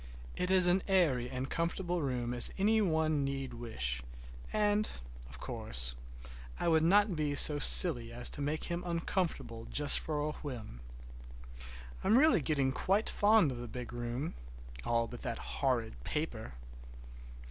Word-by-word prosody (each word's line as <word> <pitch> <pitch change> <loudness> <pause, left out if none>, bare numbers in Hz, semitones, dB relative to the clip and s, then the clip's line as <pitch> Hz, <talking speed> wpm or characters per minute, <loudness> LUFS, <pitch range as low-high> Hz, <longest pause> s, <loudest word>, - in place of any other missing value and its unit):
It 180 - -1
is 185 -1 +5
as 180 +2 +3
airy 150 -11 +2
and 130 +1 -4
comfortable 170 +3 -2
a - - -2
room 125 -3 -2
as 120 - +1
any 215 +3 +3
one 160 -5 +1
need 135 -1 -4
wish, 65 - -3 0.5
and, 210 0 +1 0.4
of 60 -1 -12
course, - - -2 0.7
I - - -1
would 160 -1 +4
not 200 +3 +3
be 150 -2 -1
so 145 +1 +5
silly 125 -7 +5
as 120 +1 +1
to - - -3
make 150 +2 -2
him 175 0 -3
uncomfortable 165 -9 -3
just 145 -1 +2
for 155 -2 -3
a 150 +1 -1
whim. 120 - -8 1.2
I'm 215 +5 +4
really 270 - +5
getting 140 -3 0
quite 195 +10 0
fond 205 -7 +4
of 125 - -6
the 120 - -6
big 120 +1 -7
room, 120 +5 -4 0.5
all 115 0 +1
but 120 - -9
that 120 -4 -4
horrid 115 - -2
paper. 115 - -4
145 Hz, 155 wpm, -32 LUFS, 120-175 Hz, 1.2 s, is